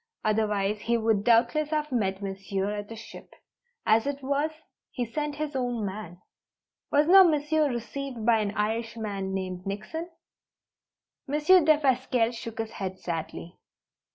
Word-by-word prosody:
Otherwise 210 -1 +1
he 235 +2 +1
would 220 -3 +1
doubtless 240 +7 +3
have 300 -1 -1
met 200 -5 -1
Monsieur 195 0 -3
at 205 0 -5
the 225 - -7
ship. 225 - -12 0.5
As 220 +4 +3
it 285 -1 -3
was, 285 +3 +1 0.4
he 245 - -3
sent 295 +5 -3
his 300 -1 -4
own 245 -4 -1
man. 190 -3 -6 0.7
Was 290 +1 +4
not 380 +1 +9
Monsieur 300 0 +2
received 245 0 -5
by 230 -1 +5
an 210 -1 0
Irishman 215 -2 -2
named 185 -1 -4
Nickson?" 215 - -5 1.2
Monsieur 300 +6 +5
Defasquelle 260 -6 +2
shook 230 -1 -7
his 225 -1 -3
head 190 -1 -5
sadly. 170 0 -6
230 Hz, 140 wpm, -27 LUFS, 205-285 Hz, 1.2 s, not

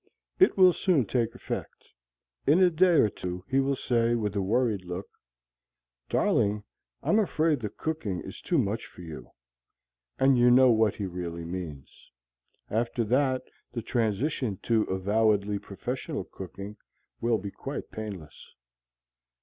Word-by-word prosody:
It 375 - +5
will 185 -2 +7
soon 165 - +2
take 115 +1 -1
effect. - - -6 0.6
In 150 +6 +6
a 185 -1 +5
day 175 +2 +4
or 130 - +6
two 90 -2 -6
he 135 - +2
will 135 0 +1
say, 120 -2 +1
with 105 -3 -2
a 100 - +1
worried 110 0 +1
look, 90 +2 -5 1.0
"Darling, 105 0 +2 0.4
I'm 215 - +3
afraid 160 -7 +1
the 110 -3 -3
cooking 130 - -3
is - - -9
too 175 - 0
much 110 -3 -1
for - - -14
you." 80 -2 -9 0.9
And 135 -1 +4
you 120 0 +6
know 130 +1 +7
what 110 -2 +3
he 100 - -3
really 85 -2 -5
means. 85 -6 -8 0.6
After 115 +2 0
that 130 +3 +1 0.3
the 120 -2 -4
transition 115 0 -1
to 115 -2 +2
avowedly 100 +1 +1
professional 110 +6 -5
cooking 100 +3 -9 0.4
will 115 -1 +2
be 100 0 -6
quite - - -6
painless. 100 -9 -8
110 Hz, 140 wpm, -28 LUFS, 100-130 Hz, 1.0 s, will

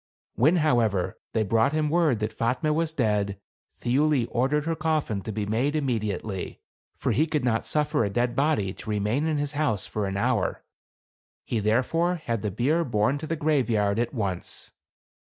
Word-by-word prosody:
When, 150 +9 +4
however, 120 - +1
they 110 - +2
brought 110 +6 +2
him 155 -1 +1
word 155 -5 +2
that 110 +1 -2
Fatme 130 +6 0
was 160 +1 0
dead, 105 -8 0 0.4
Thiuli 135 +1 +2
ordered 140 +5 +1
her 165 0 0
coffin 155 -10 -1
to 110 - -5
be 105 0 -2
made 120 +8 0
immediately; 110 -8 -2 0.4
for - - 0
he 155 +5 +2
could 150 -4 -1
not 115 -2 0
suffer 150 -5 +1
a 100 - 0
dead 120 +4 0
body 140 -10 +1
to 110 - -10
remain 105 +8 0
in 155 -2 0
his 145 0 -1
house 145 -9 -1
an 100 -2 -1
hour. 100 - 0 0.8
He 115 - -1
therefore 130 - +1
had 115 - -3
the 105 - -1
bier 135 - +1
borne 125 +2 +1
to 155 - -6
the 165 - -1
graveyard 115 -9 +1
at 120 - 0
V>nce. 100 -8 -4
120 Hz, 175 wpm, -26 LUFS, 105-150 Hz, 0.8 s, When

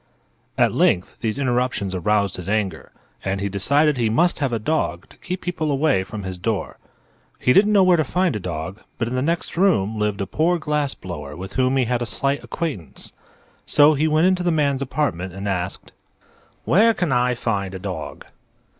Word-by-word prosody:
At - - +3
length 90 - +2
these 110 0 -1
interruptions 125 -7 0
aroused 100 +2 0
his 90 +1 -6
anger, 105 -2 -2 0.3
and 95 0 -1
he 100 +1 -2
decided 140 +9 +2
he 115 -2 +1
must 170 +11 +2
have 140 -4 0
a 115 - 0
dog 105 - -1
to - - -19
keep 185 +1 -5
people 170 -4 -2
away 135 -8 +2
from 105 +2 -7
his 95 -1 -6
door. 110 +2 -3 0.6
He 125 - +3
didn't 210 +6 +5
know 200 -2 +5
where 180 -1 +5
to 155 - +2
find 180 +4 0
a - - -2
dog, 90 +2 -5 0.2
but 115 - -1
in 120 - -4
the 130 - 0
next 165 +5 -1
room 110 - +2
lived 105 -1 -1
a 100 - -1
poor 165 - +1
glass 150 -3 -1
blower 75 -6 -7
with 95 +2 -8
whom 130 +1 +2
he 130 - +2
had 120 0 -1
a 120 - -2
slight 140 +5 -1
acquaintance; 140 - -5 0.5
so 150 +1 +6
he 155 +2 +1
went 155 +2 +3
into 185 -1 +2
the 180 - +1
man's 145 -4 +1
apartment 115 - -2
and 100 +2 -5
asked: 95 -1 -3 0.7
"Where 225 +6 +4
can 175 -6 -1
I 125 0 +2
find 100 -5 -2
a - - -3
dog?" 90 -4 -6
125 Hz, 200 wpm, -22 LUFS, 95-155 Hz, 0.7 s, so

